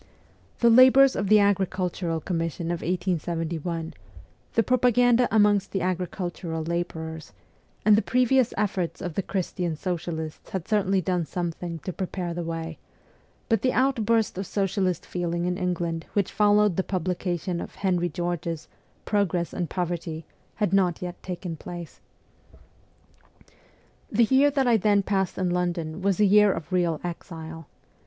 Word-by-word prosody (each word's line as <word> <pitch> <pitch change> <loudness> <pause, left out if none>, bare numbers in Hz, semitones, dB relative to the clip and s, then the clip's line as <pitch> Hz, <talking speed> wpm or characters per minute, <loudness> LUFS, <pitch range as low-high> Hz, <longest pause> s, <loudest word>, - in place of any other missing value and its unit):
The 235 -1 +6
labours 260 +2 +7
of 195 -1 -1
the 215 - +7
agricultural 185 -4 0
commission 165 0 -2
of 175 - -3
1871, 170 -2 -2 0.6
the 230 - +3
propaganda 245 0 +4
amongst 205 -2 +3
the 195 - 0
agricultural 175 -2 -3
labourers, 160 -2 -4 0.5
and 210 -1 +7
the 215 - +3
previous 250 0 +2
efforts 185 -5 -1
of 175 - -4
the 195 - -1
Christian 180 -3 -2
socialists 160 -2 -4
had 185 -3 -4
certainly 195 -3 +2
done 180 -3 -1
something 170 +1 -4
to 185 - -3
prepare 180 -1 -4
the 175 - -3
way; 165 -1 -5 0.7
but 225 - +2
the 255 - +1
outburst 230 -6 +1
of 195 - -4
socialist 195 -3 -1
feeling 175 -1 -2
in 180 0 0
England 175 -3 -2
which 200 -3 0
followed 210 -3 +3
the" 190 - +2
publication 180 -1 -2
of - - -8
Henry 180 -3 0
George's 170 -1 -3 0.2
' - - -37
Progress 185 -5 0
and 175 -2 -3
Poverty 170 -3 -3 0.2
' - - -37
had 205 -4 0
not 180 -3 +2
yet 180 0 -6
taken 180 -2 -5
place. 175 +1 -9 2.1
The 235 +2 +4
year 265 +5 +4
that 275 -2 +1
I 235 -2 +4
then 205 -1 +3
passed 190 -2 -1
in 185 -2 0
London 175 -1 -2
was 195 -1 +1
a 210 - +5
year 205 +1 +6
of 165 -2 -5
real 170 -4 +1
exile. 165 -2 -7
180 Hz, 150 wpm, -26 LUFS, 170-205 Hz, 2.1 s, labours